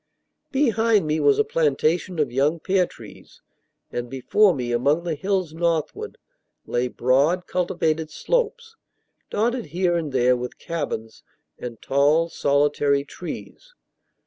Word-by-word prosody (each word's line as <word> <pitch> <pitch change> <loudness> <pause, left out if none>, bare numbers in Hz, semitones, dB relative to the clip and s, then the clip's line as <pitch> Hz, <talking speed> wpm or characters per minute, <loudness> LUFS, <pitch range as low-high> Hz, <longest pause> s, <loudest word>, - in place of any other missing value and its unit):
Behind 225 - +2
me 155 +1 0
was 420 - +4
a 435 - +4
plantation 425 - 0
of 145 -5 0
young 145 +6 +1
pear 185 +1 +1
trees, - - -14 0.5
and 120 0 -4
before 185 - +3
me, 125 -7 -3
among 140 +8 +2
the 170 -2 -2
hills 185 +1 -1
northward, 165 -2 -2 0.5
lay 120 +1 0
broad, 140 +9 +2
cultivated 160 -3 -1
slopes, 465 - -2 0.5
dotted 235 +2 0
here 175 +3 0
and 160 -4 -2
there 125 -1 +3
with 125 0 -6
cabins 130 -9 -5 0.4
and 120 -3 -7
tall, 150 +5 +3
solitary 140 -1 +2
trees. - - -9
160 Hz, 125 wpm, -23 LUFS, 140-195 Hz, 0.5 s, was